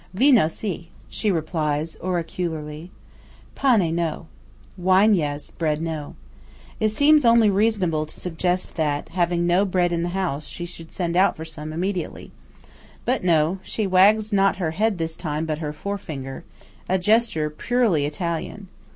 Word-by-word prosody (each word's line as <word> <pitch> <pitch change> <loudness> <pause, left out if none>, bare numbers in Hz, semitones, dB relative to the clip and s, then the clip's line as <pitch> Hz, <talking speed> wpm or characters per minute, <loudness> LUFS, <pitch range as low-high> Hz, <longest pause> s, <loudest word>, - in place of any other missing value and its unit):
"Vino 250 - +5
si," 170 -1 -5 0.2
she 215 - -1
replies, 155 -2 -1
oracularly. 165 -3 -4 0.6
"Pane, 215 -12 +2
no." 165 -1 -2 0.5
(Wine, 190 +3 +4
yes; 150 -5 -2
bread, 155 -2 -1
no.) 160 -3 -5 0.6
It 215 - +2
seems 290 +6 +4
only 230 -3 +5
reasonable 190 -7 +1
to - - -11
suggest 180 +2 -2
that, 145 -2 -1
having 175 -1 0
no 175 +3 +3
bread 180 -3 +1
in 170 -1 0
the 175 - -1
house, 175 -6 -2
she 175 - -5
should 165 -2 -10
send 170 -2 -2
out 190 +2 +3
for 160 - -6
some 155 -1 -7
immediately. 180 +3 -4 0.7
But 255 -3 0
no. 165 +1 +2
she 205 +3 -2
wags 205 +3 +4
not 195 0 +3
her 170 -4 -2
head 210 +4 0
this 160 -1 -3
time, 155 -2 -3
but 155 -1 -3
her 150 -2 -3
fore 200 +7 -4
finger–a 145 +4 -6
gesture 190 -6 +2
purely 190 - +1
Italian. 170 +5 -4
175 Hz, 150 wpm, -23 LUFS, 160-195 Hz, 0.7 s, Vino